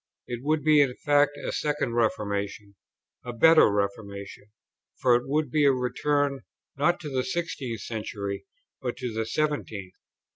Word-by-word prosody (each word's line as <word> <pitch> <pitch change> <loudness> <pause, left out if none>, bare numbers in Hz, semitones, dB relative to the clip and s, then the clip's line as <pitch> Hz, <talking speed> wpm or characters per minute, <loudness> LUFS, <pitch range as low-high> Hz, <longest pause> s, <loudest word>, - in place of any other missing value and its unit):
It 120 -1 -5
would 150 +1 0
be 155 -1 +6
in 130 -3 +1
fact 145 0 +3
a - - -4
second 150 -5 -1
Reformation: 100 -3 -1 0.5
a 120 - -5
better 160 +1 +6
reformation, 100 0 -4 0.5
for 125 -2 +4
it 120 +2 -1
would 150 -1 0
be 150 +2 +3
a 140 - +7
return 140 +2 0 0.4
not 170 +5 +2
to 150 - -5
the 130 -1 0
sixteenth 135 -10 -3
century, 100 -3 -5 0.3
but 125 -2 -3
to 125 -3 -4
the 110 0 -2
seventeenth. 115 -12 -2
125 Hz, 150 wpm, -27 LUFS, 105-145 Hz, 0.5 s, a